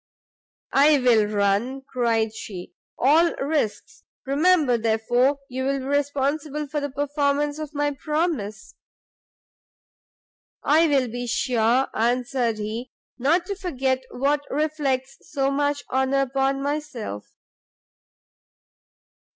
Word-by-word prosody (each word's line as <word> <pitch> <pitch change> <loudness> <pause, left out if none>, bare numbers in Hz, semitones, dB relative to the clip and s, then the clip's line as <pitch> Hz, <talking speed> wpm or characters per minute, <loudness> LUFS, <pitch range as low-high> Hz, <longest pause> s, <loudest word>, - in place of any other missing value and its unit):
"I 290 +2 +6
will 235 -5 +4
run," 210 +6 0
cried 230 -4 0
she, 185 -5 -8 0.2
"all 320 +6 +4
risks; 280 -6 -2 0.2
remember, 295 -1 +3
therefore, 235 +4 +2
you 260 0 -4
will 275 +1 0
be 260 - -6
responsible 285 +1 -1
for 295 +1 -3
the 285 - -2
performance 290 +1 0
of 305 -1 -7
my 290 0 +1
promise." 295 - -3 1.9
"I 315 +3 +4
will 275 -4 +2
be 245 +1 -5
sure," 240 +1 +2
answered 240 0 0
he, 220 +4 -5 0.3
"not 325 +8 +2
to 400 - -4
forget 270 -9 -1
what 285 +3 0
reflects 275 -3 -1
so 275 -2 -1
much 285 0 0
honour 265 +1 +2
upon 270 +1 0
myself." 285 - -4
275 Hz, 110 wpm, -24 LUFS, 245-290 Hz, 1.9 s, I